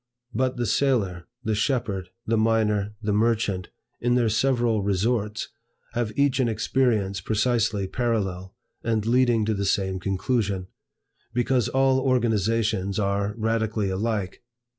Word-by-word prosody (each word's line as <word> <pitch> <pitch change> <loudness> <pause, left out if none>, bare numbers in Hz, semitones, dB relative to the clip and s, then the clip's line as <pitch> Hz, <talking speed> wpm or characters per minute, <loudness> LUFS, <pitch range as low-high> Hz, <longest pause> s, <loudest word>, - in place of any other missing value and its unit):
But 130 +2 0
the 120 - 0
sailor, 105 -7 +1 0.2
the 110 - 0
shepherd, 105 -5 -1 0.2
the 115 - +1
miner, 105 -2 +1
the 105 -1 0
merchant, 105 -4 +1 0.3
in 120 0 +1
their 120 -2 +3
several 120 -1 +2
resorts, 105 +2 0 0.4
have 120 -2 -1
each 140 -1 +2
an 125 -3 +2
experience 110 -4 +1
precisely 110 -2 +1
parallel, 95 -4 -2 0.3
and 110 -2 0
leading 120 -2 +3
to 110 - +1
the 100 -1 -2
same 95 -1 0
conclusion: 100 0 -1 0.7
because 125 -1 +1
all 135 0 +3
organizations 110 -5 +1
are 100 0 0
radically 110 -2 0
alike. 100 -1 -2
110 Hz, 125 wpm, -25 LUFS, 100-120 Hz, 0.7 s, their